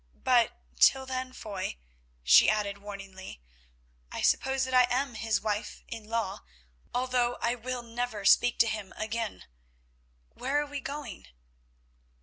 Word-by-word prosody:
But, 245 -2 +3 0.2
till 265 0 +5
then, 255 0 -4
Foy," 200 - -5 0.5
she - - +7
added, 205 -2 0
warningly, 195 - -9 0.7
"I - - -4
suppose 265 0 +2
that 260 0 -3
I 250 -1 +6
am 265 +1 0
his 220 -1 0
wife 210 0 -3
in 225 -2 -7
law, 225 -4 -1 0.5
although 245 -1 +1
I 235 - +1
will 250 +1 -4
never 230 -3 -4
speak 245 +4 +5
to 230 - +4
him 215 -4 -4
again. 220 0 -3 0.9
Where 275 +3 0
are 295 - -1
we 290 -1 -5
going?" 280 -7 -7
235 Hz, 135 wpm, -29 LUFS, 210-255 Hz, 0.9 s, she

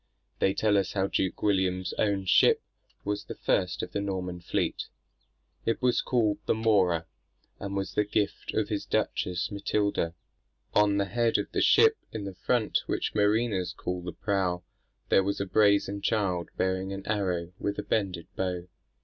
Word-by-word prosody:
They 95 - +2
tell 105 -2 +3
us 95 - -2
how 95 -2 +1
Duke 95 -1 -1
William's 95 -2 +1
own 100 -2 +1
ship - - +5 0.4
was 105 0 -2
the - - -7
first - - 0
of - - -5
the 100 - -2
Norman 90 -3 -3
fleet. 85 - -1 0.8
"It 115 - 0
was 125 -1 +2
called 110 -5 +1
the - - +3
Mora, 95 -7 +2 0.5
and 100 0 -4
was 95 -1 -2
the 105 - +2
gift 105 0 -2
of - - 0
his - - -3
duchess, 90 -1 -1
Matilda. 100 -4 0 0.6
On 105 -1 +4
the 100 - +2
head 115 +4 +1
of - - -3
the - - 0
ship 445 -1 +6
in 110 - -5
the 100 - -5
front, 110 +4 +1
which - - -1
mariners 105 -2 +1
call 90 0 -4
the 90 0 -5
prow, 90 -2 -1 0.5
there - - +5
was 100 +1 -1
a 100 - -1
brazen 100 0 +3
child 95 -6 0
bearing 95 +1 0
an 100 0 -6
arrow 90 -5 -1
with 100 0 -2
a 105 - -3
bended 95 -5 -1
bow. 90 -2 -2
100 Hz, 170 wpm, -28 LUFS, 90-105 Hz, 0.8 s, ship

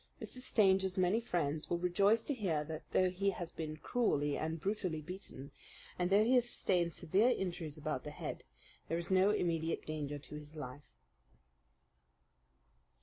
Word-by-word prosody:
Mr. 255 - -6
Stanger's 190 -6 +3
many 185 +5 +3
friends 160 -8 -1
will 175 - +1
rejoice 195 +6 +3
to 290 - -1
hear 180 - 0
that, 155 +1 -5
though 185 -1 +3
he 195 +2 +1
has 175 -3 -4
been 155 -1 -5
cruelly 145 - +1
and 160 +1 -2
brutally 190 -3 -1
beaten, 155 -5 -8 0.5
and 180 0 +1
though 200 +2 +6
he 240 +4 +3
has 245 -1 +4
sustained 175 -6 +1
severe 185 +9 +2
injuries 175 - -2
about 150 -3 -3
the - - -5
head, 150 - -6 0.4
there 165 - 0
is 170 +2 -4
no 190 +1 +5
immediate 165 -5 0
danger 145 -2 -3
to 145 - -11
his 150 +1 -9
life. 145 -1 -8
175 Hz, 160 wpm, -35 LUFS, 155-195 Hz, 0.5 s, though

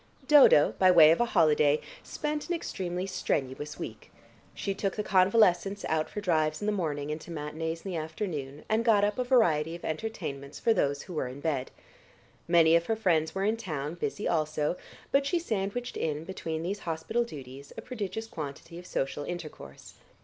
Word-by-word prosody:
Dodo, 280 - +7
by 185 - +6
way 160 -3 +8
of 165 - +2
a - - +4
holiday, 155 -7 +3 0.2
spent 300 +1 -4
an 350 - +1
extremely 180 - -4
strenuous 145 -6 -3
week. - - -8 0.4
She 200 - -2
took 195 0 -2
the 210 - -2
convalescents 195 0 +3
out 155 -1 0
for 210 - -5
drives 155 -5 +1
in - - -4
the 210 - +2
morning, 150 -7 -2
and 155 +1 -4
to - - -12
matinées 160 +2 -4
in 195 - -3
the 175 - -2
afternoon, 155 -3 -5
and 220 +1 +1
got 215 -3 +4
up 205 +3 0
a - - +2
variety 170 - +3
of 170 - -9
entertainments 150 -6 -5
for 230 - +3
those 140 -7 0
who 180 - -9
were 150 -5 -1
in 130 +2 -8
bed. 145 -4 -2 0.8
Many 165 -1 +5
of 170 0 +2
her 225 - +1
friends 170 -7 +1
were 195 +1 0
in 220 +2 +1
town, 155 -9 -4
busy 210 +4 -3
also, 155 -1 0 0.4
but 275 0 +3
she 350 - +1
sandwiched 235 - -3
in, 155 -1 -2
between 165 -3 -4
these 195 +4 -3
hospital 170 +9 -1
duties, 140 - -10
a - - -6
prodigious 220 -3 -4
quantity 165 -1 -7
of 180 - -12
social 135 -1 -2
intercourse. 155 - -8
170 Hz, 185 wpm, -29 LUFS, 155-205 Hz, 0.8 s, way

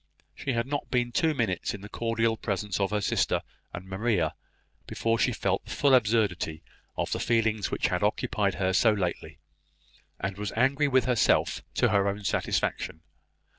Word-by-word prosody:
She 135 - -3
had 115 0 0
not 145 +2 -3
been 120 -1 0
two 160 +2 +1
minutes 110 -6 -1
in 100 - -10
the 105 - -8
cordial 115 +1 0
presence 105 -2 -3
of 100 -1 +1
her 105 0 -1
sister - - +1 0.3
and 90 +1 -7
Maria, 95 -4 0 0.5
before 115 0 0
she 125 - +3
felt 100 -4 -1
the - - -13
full 140 -2 +3
absurdity 105 -9 +2 0.3
of - - -2
the - - -1
feelings 110 -3 +1
which - - 0
had - - -1
occupied - - 0
her 95 0 0
so 110 +4 +5
lately, 90 -4 -3 0.8
and 95 +1 -4
was 105 -1 -3
angry 135 +5 +2
with 130 -3 +3
herself 125 -3 +2
to - - +3
her 100 -1 +2
own 100 +1 -2
satisfaction. 80 -4 -1
110 Hz, 170 wpm, -28 LUFS, 95-120 Hz, 0.8 s, so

